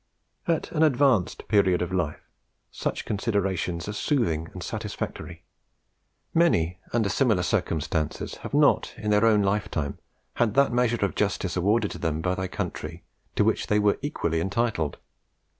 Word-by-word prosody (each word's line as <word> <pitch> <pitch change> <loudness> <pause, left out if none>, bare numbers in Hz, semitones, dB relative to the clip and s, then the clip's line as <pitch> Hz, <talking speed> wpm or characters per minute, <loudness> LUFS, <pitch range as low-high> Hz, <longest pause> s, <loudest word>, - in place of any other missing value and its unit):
"At 165 -2 0
an 155 - 0
advanced 135 - +3
period 95 -4 +3
of 90 +1 -4
life, 85 -5 -2 0.4
such - - -3
considerations 95 -5 -1
are 105 - -3
soothing 105 - 0
and - - -7
satisfactory. - - -5 0.9
Many 90 - +2
under 115 -3 +1
similar 105 -3 +2
circumstances 80 -5 -1
have - - -5
not, - - +3
in 105 - -2
their 105 +2 +4
own 105 -2 +4
lifetime, 95 -8 -1 0.4
had 115 -3 +2
that 140 -2 +4
measure 120 -3 +2
of 100 - -3
justice 95 -3 -1
awarded 105 +4 +2
to - - -7
them 80 -2 -1
by 90 +3 0
their 95 0 -2
country 85 -1 -5 0.3
to - - +3
which - - +1
they 105 - +2
were 105 -1 +2
equally 85 - -1
entitled. 95 -5 -1
100 Hz, 150 wpm, -26 LUFS, 85-115 Hz, 0.9 s, their